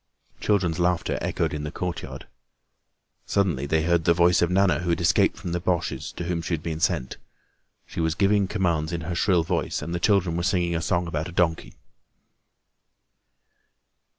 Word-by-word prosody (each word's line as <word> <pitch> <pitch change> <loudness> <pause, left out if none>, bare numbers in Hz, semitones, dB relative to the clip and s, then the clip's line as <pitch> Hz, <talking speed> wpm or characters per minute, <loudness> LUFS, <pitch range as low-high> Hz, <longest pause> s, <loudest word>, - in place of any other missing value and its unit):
Children's 90 -5 +1
laughter 90 0 0
echoed - - -1
in 75 -1 -4
the 75 - -4
courtyard. 90 0 -5 1.0
Suddenly 85 -9 0
they 80 +2 +1
heard 85 -1 +1
the 85 - +4
voice 85 0 +4
of 85 - +2
Nana, 95 +1 +3
who 90 0 -3
had 85 - +1
escaped 85 - +3
from 90 -2 -6
the 85 - -1
Boches 90 -1 -2
to - - -5
whom 85 -1 -2
she 85 +1 -1
had 75 - -9
been 80 -2 -3
sent. 65 -5 -1 0.7
She - - -8
was 80 -1 0
giving 100 +1 +2
commands 85 -6 0
in 85 -1 -3
her 85 +2 -4
shrill 85 0 +2
voice 85 +1 -1
and 85 - -5
the 85 - -1
children 95 -3 +2
were 85 - -1
singing 90 -2 +1
a 80 - -1
song 85 +1 0
about 80 0 -3
a - - -9
donkey. 85 -2 0
85 Hz, 180 wpm, -25 LUFS, 80-90 Hz, 1.0 s, the